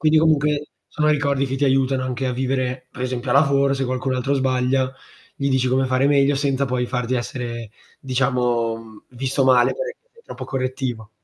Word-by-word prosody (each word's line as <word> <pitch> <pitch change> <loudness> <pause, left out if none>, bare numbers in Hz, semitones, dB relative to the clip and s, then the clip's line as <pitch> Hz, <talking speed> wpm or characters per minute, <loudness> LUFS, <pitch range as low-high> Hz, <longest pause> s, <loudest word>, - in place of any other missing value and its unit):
quindi 155 0 +4
comunque, 150 -2 +2 0.2
sono 150 0 0
ricordi 140 -2 +1
che 135 +1 -3
ti 140 - +1
aiutano 135 -1 +2
anche 130 +1 -2
a 125 - 0
vivere, 130 0 -2
per 125 - -7
esempio, 125 0 -3
a - - +3
lavoro 140 -1 +4
se 135 0 -1
qualcun 130 +1 -1
altro 135 +3 0
sbaglia, 130 0 +1 0.4
gli 140 0 -1
dici 130 -1 +2
come 130 +1 +2
fare 130 +2 +2
meglio, 140 0 +4
senza 140 -1 0
poi 125 -1 -1
farti 125 0 -2
essere 120 -2 -4 0.3
diciamo, 125 -3 0
mhmm, 110 -1 -13
visto 130 +2 -1
male 125 -2 +5
perché - - -5 0.2
sei 465 0 -21
troppo - - -8
correttivo. 130 -4 -3
130 Hz, 185 wpm, -22 LUFS, 125-140 Hz, 0.4 s, male